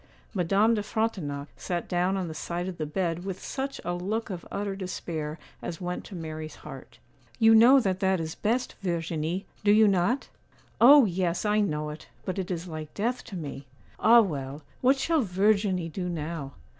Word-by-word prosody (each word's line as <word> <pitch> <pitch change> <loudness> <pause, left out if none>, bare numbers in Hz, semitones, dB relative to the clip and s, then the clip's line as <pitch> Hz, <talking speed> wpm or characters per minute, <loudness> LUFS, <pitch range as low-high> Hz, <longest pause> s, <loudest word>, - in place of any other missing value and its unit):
Madame 200 +4 +3
de 215 - +1
Frontignac 185 -10 -2
sat 175 -1 -3
down 180 +2 +1
on 185 -2 -2
the 160 - -5
side 175 +3 -4
of 180 -3 -6
the 155 - -2
bed 170 +1 -2
with 190 -1 -5
such 275 +1 -4
a 175 - -1
look 205 +5 -2
of 175 -2 -5
utter 200 -1 -2
despair 165 -5 -4 0.2
as 165 - -5
went 180 0 -4
to 195 - -10
Mary's 155 -2 -6
heart. 135 -3 -10 0.4
'You 225 0 +6
know 240 +5 +8
that 190 -6 0
that 190 -2 +2
is 160 0 -3
best, 235 +7 -1
Verginie, 170 0 -2 0.2
do 205 - +5
you 215 +1 +6
not?' 200 +7 +1 0.5
'Oh! 275 +2 +9
yes, 180 -1 -1
I 210 0 +3
know 150 -7 -1
it; 150 - -10 0.2
but 185 +1 -2
it 190 0 -3
is 175 -1 -3
like 155 -2 -6
death 240 +4 -1
to 210 - -8
me! 145 -5 -6 0.3
Ah, 235 +2 +7
well, 145 -6 -4 0.2
what 265 +2 +4
shall 320 +2 +2
Verginie 195 -3 +1
do 180 +1 -3
now? 155 -4 -4
185 Hz, 185 wpm, -27 LUFS, 165-210 Hz, 0.5 s, Oh